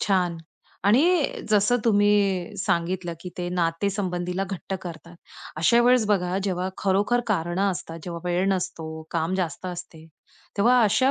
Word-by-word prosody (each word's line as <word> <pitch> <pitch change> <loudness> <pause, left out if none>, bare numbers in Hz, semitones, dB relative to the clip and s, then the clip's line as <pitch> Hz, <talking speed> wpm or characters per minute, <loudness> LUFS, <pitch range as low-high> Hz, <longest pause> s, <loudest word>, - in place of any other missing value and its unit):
छान 180 -4 +1 0.5
आणि 230 +8 +5 0.5
जसं 210 +3 +4
तुम्ही 205 -2 +2
सांगितलं, 175 -2 -1
की 180 +1 -7
ते 175 0 -2
नाते 175 +2 0
संबंधीला 180 -1 -2
घट्ट 195 0 -5
करतात. 170 0 -9 0.4
अशा 235 +10 +4
वेळेस 245 -2 +4
बघा 185 -3 +1
जेव्हा 185 -1 -1
खरोखर 205 +5 +2
कारणं 190 0 0
असतात 165 -2 -6
जेव्हा 170 -1 -5
वेळ 180 +2 +1
नसतो, 160 -4 -4
काम 165 +2 -1
जास्त 185 -1 -3
असते. 175 -3 -8 0.5
तेव्हा 245 +5 +5
अशा 225 +6 +3
185 Hz, 140 wpm, -25 LUFS, 175-205 Hz, 0.5 s, आणि